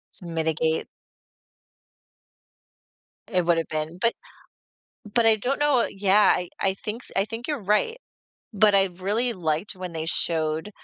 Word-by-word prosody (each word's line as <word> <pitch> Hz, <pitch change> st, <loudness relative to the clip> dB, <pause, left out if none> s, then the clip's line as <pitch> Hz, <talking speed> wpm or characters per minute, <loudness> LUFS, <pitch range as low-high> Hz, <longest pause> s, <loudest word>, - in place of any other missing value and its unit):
To 180 Hz, -, -5 dB
mitigate. 160 Hz, -1 st, 0 dB, 2.4 s
It 180 Hz, -5 st, +1 dB
would've 165 Hz, -1 st, +2 dB
been 155 Hz, +2 st, -3 dB
but 230 Hz, +3 st, +2 dB, 1.0 s
But 235 Hz, -2 st, +3 dB
I 225 Hz, -1 st, +6 dB
don't 250 Hz, +7 st, -2 dB
know 295 Hz, -3 st, +3 dB
i -, -, +2 dB
Yeah, 200 Hz, +1 st, +4 dB
I 180 Hz, -1 st, -4 dB
I 190 Hz, -, +1 dB
thinks 215 Hz, +5 st, -6 dB
I 195 Hz, -, +3 dB
think 225 Hz, +2 st, -6 dB
you're 295 Hz, -3 st, -2 dB
right, 210 Hz, -, +1 dB, 0.6 s
but 210 Hz, -1 st, +4 dB
I 195 Hz, -1 st, +5 dB
really 200 Hz, +7 st, -1 dB
liked 170 Hz, +1 st, -2 dB
when 185 Hz, -1 st, -6 dB
they 160 Hz, -1 st, -4 dB
showed 160 Hz, +2 st, -1 dB
195 Hz, 145 wpm, -25 LUFS, 165-225 Hz, 2.4 s, I